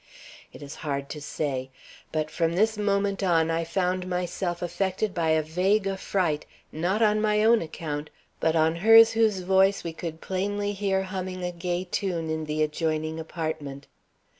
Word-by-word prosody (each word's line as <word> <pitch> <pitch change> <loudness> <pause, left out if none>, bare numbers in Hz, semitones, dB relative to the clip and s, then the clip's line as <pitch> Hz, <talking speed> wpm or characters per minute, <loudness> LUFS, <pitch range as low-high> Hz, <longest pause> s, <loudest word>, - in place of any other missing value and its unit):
It - - -11
is 140 +1 -8
hard 140 -2 -3
to 150 - -6
say; 135 -3 -3 0.4
but 155 -1 -2
from 165 -1 0
this 220 +4 +2
moment 200 -1 0
on 165 -4 +2
I 165 0 0
found 180 +2 -1
myself 180 0 -2
affected 190 +3 -1
by 165 -3 0
a 160 0 +3
vague 190 +6 +1
affright, 190 -5 -1 0.3
not 185 +8 0
on 215 0 +3
my 210 0 +2
own 230 +1 +5
account, 150 -2 -5 0.3
but 160 0 +1
on 160 +1 +2
hers 225 +4 +8
whose 220 -4 +2
voice 190 +2 +3
we 165 - -4
could 160 0 -6
plainly 205 +3 -2
hear 195 -1 0
humming 185 -1 -5
a 180 - -1
gay 175 +1 -2
tune 180 -4 -2
in 160 0 -2
the 155 0 0
adjoining 155 +1 -1
apartment. 155 -4 -5
175 Hz, 165 wpm, -26 LUFS, 160-195 Hz, 0.4 s, hers